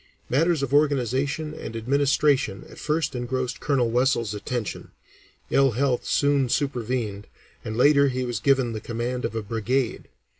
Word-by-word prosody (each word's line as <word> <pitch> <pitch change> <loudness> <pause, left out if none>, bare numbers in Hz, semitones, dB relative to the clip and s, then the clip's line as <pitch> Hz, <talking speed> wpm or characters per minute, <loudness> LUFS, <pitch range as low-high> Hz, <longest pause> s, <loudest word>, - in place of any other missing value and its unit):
Matters 160 +3 +2
of 140 0 -3
organization 145 +1 +1
and 115 - -7
administration 140 -2 +1
at - - -13
first 150 -1 -1
engrossed 125 0 -3
Colonel 125 -4 +1
Wessells' 120 -3 +1
attention; 110 +1 -4 0.6
ill 135 -3 +4
health 130 +1 0
soon 140 -3 +2
supervened, 120 -6 -2 0.4
and 110 0 -5
later 140 +2 +5
he 130 -1 -1
was 120 -3 -3
given 130 -4 +2
the 110 - -5
command 120 +2 -3
of 115 - -4
a 110 - -2
brigade. 115 +4 -1
130 Hz, 145 wpm, -25 LUFS, 115-140 Hz, 0.6 s, later